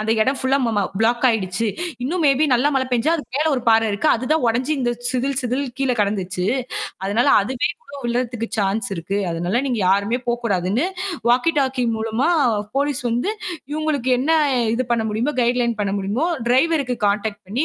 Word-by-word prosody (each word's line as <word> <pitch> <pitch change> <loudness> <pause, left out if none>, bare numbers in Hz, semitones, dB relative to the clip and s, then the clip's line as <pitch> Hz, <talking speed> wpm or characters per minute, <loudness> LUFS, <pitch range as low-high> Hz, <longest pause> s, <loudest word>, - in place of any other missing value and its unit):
அந்த 215 +1 -1
இடம் 265 +5 +2
ஃபுல்லா 260 -5 +1 0.2
பிளாக் 235 +2 +2
ஆயிடுச்சு. 205 -1 0 0.4
இன்னும் 330 +7 -1
மே 280 - +6
பி 305 - +3
நல்லா 250 +4 +3
மழை 260 -1 +1
பேஞ்சா, 245 +5 +1
அது 310 - -5
மேல 305 +2 +1
ஒரு 255 - -1
பாற 225 0 +5
இருக்கு. 205 +10 0
அது 240 +2 -3
தான் 315 -3 +1
உடஞ்சி 250 +5 0
இந்தச் 240 -1 -2
சிதில், 260 +1 -1
சிதில் 250 +3 -1 0.2
கீழ 270 - 0
கிடந்துச்சு. 190 -3 -1 0.6
அதனால, 210 +6 +1 0.2
அதுவே 250 +4 -1 0.4
விழறதுக்கு 240 -1 -2
சான்ஸ் 195 +1 0
இருக்கு. 195 +4 -3
அதனால 175 +9 -1
நீங்க 245 -5 -1
யாருமே 200 +5 +2
போகக் 240 0 -1
கூடாதுன்னு 200 - 0 0.4
வாக்கி 250 +7 +3
டாக்கி 260 -2 0
மூலமா 225 +6 0 0.5
போலீஸ் 285 -1 +1
வந்து 245 - 0 0.4
இவுங்களுக்கு 300 -4 -1
என்ன 270 - -2 0.5
இது 255 +2 -1
பண்ண 225 -2 +1
முடியுமோ! 235 +8 -1
கைடுலைன் 235 -1 +1
பண்ண 200 -1 -1
முடியுமோ 205 +11 -1 0.2
டிரைவருக்கு 265 -1 +2
கான்டெக்ட் 205 0 -2
பண்ணி 250 +10 0
240 Hz, 170 wpm, -21 LUFS, 215-265 Hz, 0.6 s, மே